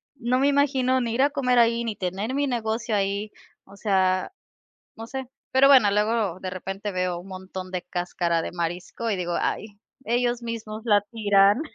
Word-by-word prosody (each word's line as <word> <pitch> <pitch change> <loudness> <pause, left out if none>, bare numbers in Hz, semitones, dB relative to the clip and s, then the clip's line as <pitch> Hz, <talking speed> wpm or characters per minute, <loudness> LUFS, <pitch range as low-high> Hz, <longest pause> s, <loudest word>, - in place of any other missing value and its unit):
no 250 -1 0
me 275 - +3
imagino 265 -2 +2
ni 235 -2 -2
ir 255 - +1
a 285 - +5
comer 250 -4 +2
ahí, 235 0 +3
ni 220 -3 -3
tener 195 +7 -3
mi 285 0 +1
negocio 225 -2 -1
ahí, 200 +1 -1 0.3
o 195 - -15
sea, 190 -2 +1 0.7
no 225 0 -7
sé. 265 0 -5 0.2
Pero 270 +1 +6
bueno, 255 -7 +7
luego 210 -2 0
de 185 - -3
repente 195 +3 -5
veo 180 -1 -1
un 185 +3 -12
montón 185 0 -7
de 180 - -2
cáscara 175 -1 -1
de - - -5
marisco 175 +6 -4
y 210 - +1
digo: 175 -2 -2
"Ay, 215 - -1 0.4
ellos 240 0 0
mismos 225 -2 -5
la 205 -3 +4
tiran". 205 +2 +4
215 Hz, 185 wpm, -25 LUFS, 190-245 Hz, 0.7 s, bueno